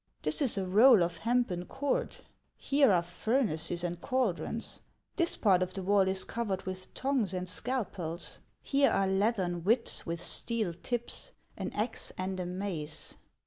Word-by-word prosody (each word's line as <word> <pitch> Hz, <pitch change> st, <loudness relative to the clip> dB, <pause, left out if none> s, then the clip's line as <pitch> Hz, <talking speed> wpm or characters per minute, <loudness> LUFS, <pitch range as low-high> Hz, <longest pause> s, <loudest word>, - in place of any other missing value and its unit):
"This -, -, +1 dB
is 260 Hz, -7 st, +3 dB
a 195 Hz, -, 0 dB
roll 215 Hz, +2 st, +6 dB
of 170 Hz, -1 st, -2 dB
hempen 230 Hz, -7 st, 0 dB
cord; 285 Hz, -, -2 dB, 0.4 s
here 275 Hz, -4 st, +3 dB
are 175 Hz, -2 st, +3 dB
furnaces 175 Hz, -, -1 dB
and 175 Hz, 0 st, -3 dB
caldrons; 230 Hz, -3 st, -1 dB, 0.3 s
this 340 Hz, -2 st, +1 dB
part 190 Hz, -4 st, +4 dB
of 185 Hz, 0 st, -2 dB
the 190 Hz, -, -4 dB
wall 195 Hz, 0 st, +3 dB
is 190 Hz, 0 st, +1 dB
covered 210 Hz, -5 st, -3 dB
with 185 Hz, 0 st, -6 dB
tongs 255 Hz, -8 st, 0 dB
and 180 Hz, 0 st, -3 dB
scalpels; 185 Hz, -7 st, -3 dB, 0.2 s
here 275 Hz, 0 st, +3 dB
are 195 Hz, -, +2 dB
leathern 190 Hz, -3 st, 0 dB
whips 230 Hz, +5 st, +3 dB
with 170 Hz, 0 st, -4 dB
steel 220 Hz, 0 st, 0 dB
tips, 240 Hz, -, -2 dB, 0.2 s
an -, -, -4 dB
axe 225 Hz, +3 st, -1 dB
and 185 Hz, 0 st, -3 dB
a 180 Hz, -, -3 dB
mace." 180 Hz, -5 st, -5 dB
195 Hz, 155 wpm, -31 LUFS, 180-240 Hz, 0.4 s, roll